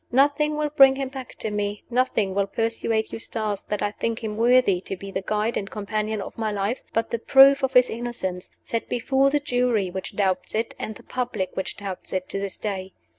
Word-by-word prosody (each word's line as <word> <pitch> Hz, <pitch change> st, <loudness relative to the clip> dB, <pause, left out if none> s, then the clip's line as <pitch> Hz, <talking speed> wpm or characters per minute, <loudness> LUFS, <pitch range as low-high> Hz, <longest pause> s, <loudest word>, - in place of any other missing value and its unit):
Nothing 290 Hz, +4 st, +3 dB
will 300 Hz, -1 st, -1 dB
bring 270 Hz, -2 st, +7 dB
him 270 Hz, -1 st, -3 dB
back 265 Hz, -1 st, -8 dB
to 220 Hz, -, -4 dB
me 205 Hz, 0 st, -2 dB
nothing 235 Hz, -6 st, +1 dB
will 200 Hz, 0 st, +1 dB
persuade 225 Hz, +1 st, -1 dB
Eustace 215 Hz, -3 st, -2 dB
that 210 Hz, -, -3 dB
I 205 Hz, -, 0 dB
think 230 Hz, +2 st, -3 dB
him 215 Hz, -1 st, -3 dB
worthy 230 Hz, -5 st, +4 dB
to 190 Hz, -, -5 dB
be 195 Hz, +2 st, -8 dB
the 190 Hz, -, -2 dB
guide 215 Hz, +3 st, -1 dB
and 195 Hz, -, -4 dB
companion 215 Hz, 0 st, -2 dB
of -, -, -10 dB
my 220 Hz, -1 st, 0 dB
life 205 Hz, +4 st, -1 dB
but 225 Hz, 0 st, -1 dB
the 235 Hz, -, -1 dB
proof 275 Hz, +3 st, +7 dB
of 265 Hz, -1 st, 0 dB
his 250 Hz, 0 st, +6 dB
innocence, 225 Hz, -6 st, -4 dB
set 230 Hz, -1 st, -3 dB
before 265 Hz, +3 st, +2 dB
the 295 Hz, +1 st, +2 dB
Jury 245 Hz, -8 st, +1 dB
which 190 Hz, 0 st, -6 dB
doubts 190 Hz, -2 st, 0 dB
it, 225 Hz, +1 st, -1 dB
and 215 Hz, -, -4 dB
the -, -, -13 dB
public 240 Hz, -7 st, -3 dB
which 190 Hz, -, -3 dB
doubts 195 Hz, -2 st, -6 dB
it, 185 Hz, -1 st, -2 dB
to 195 Hz, -, -3 dB
this 195 Hz, -1 st, -4 dB
day. 190 Hz, -3 st, -4 dB
220 Hz, 215 wpm, -24 LUFS, 200-250 Hz, -, bring